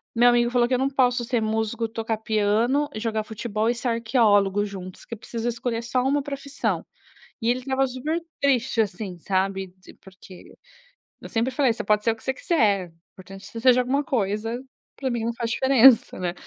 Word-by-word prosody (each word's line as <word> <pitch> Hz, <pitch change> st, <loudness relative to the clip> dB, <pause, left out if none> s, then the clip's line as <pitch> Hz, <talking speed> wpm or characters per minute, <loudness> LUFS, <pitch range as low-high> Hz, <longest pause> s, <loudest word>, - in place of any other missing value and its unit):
meu 240 Hz, +1 st, +6 dB
amigo 240 Hz, 0 st, +3 dB
falou 245 Hz, -1 st, +3 dB
que 255 Hz, -, -2 dB
eu -, -, +1 dB
não 270 Hz, +1 st, +1 dB
posso 250 Hz, -3 st, +2 dB
ser 240 Hz, -1 st, 0 dB
músico, 220 Hz, +1 st, -1 dB
tocar 225 Hz, 0 st, -3 dB
piano 220 Hz, +7 st, +1 dB
e -, -, -3 dB
jogar 220 Hz, -1 st, -2 dB
futebol 220 Hz, 0 st, -2 dB
e 245 Hz, -, +1 dB
ser 240 Hz, +2 st, -4 dB
arqueólogo 215 Hz, -4 st, +2 dB
juntos, 185 Hz, -2 st, -9 dB
que -, -, -9 dB
eu -, -, -15 dB
preciso 230 Hz, 0 st, -5 dB
escolher 235 Hz, -1 st, -3 dB
só 250 Hz, +1 st, 0 dB
uma 280 Hz, +2 st, +1 dB
profissão. 280 Hz, 0 st, -3 dB, 0.6 s
E 230 Hz, -, +1 dB
ele 250 Hz, +1 st, +1 dB
estava 265 Hz, +1 st, 0 dB
super 290 Hz, +7 st, -3 dB, 0.2 s
triste 260 Hz, -4 st, +2 dB
assim, 200 Hz, -4 st, -4 dB
sabe, 190 Hz, +1 st, -1 dB
di 185 Hz, -, -15 dB
porque, 185 Hz, -1 st, -15 dB, 0.7 s
eu -, -, -8 dB
sempre 230 Hz, +3 st, 0 dB
falei 260 Hz, -3 st, +2 dB
você -, -, -5 dB
pode 210 Hz, 0 st, +2 dB
ser 230 Hz, -, +3 dB
o -, -, -7 dB
que 225 Hz, -, -20 dB
você 265 Hz, -, -1 dB
quiser, 205 Hz, -, +1 dB, 0.2 s
importante 195 Hz, +1 st, -12 dB
que -, -, -13 dB
você 230 Hz, -, -6 dB
seja 255 Hz, 0 st, +5 dB
alguma 275 Hz, +3 st, 0 dB
coisa, 225 Hz, -2 st, -2 dB, 0.4 s
para 265 Hz, -2 st, -2 dB
mim 235 Hz, -2 st, -2 dB
não 235 Hz, -, -2 dB
faz 230 Hz, -1 st, -3 dB
diferença, 265 Hz, -2 st, +5 dB
né 175 Hz, -1 st, -1 dB
230 Hz, 205 wpm, -24 LUFS, 210-255 Hz, 0.7 s, meu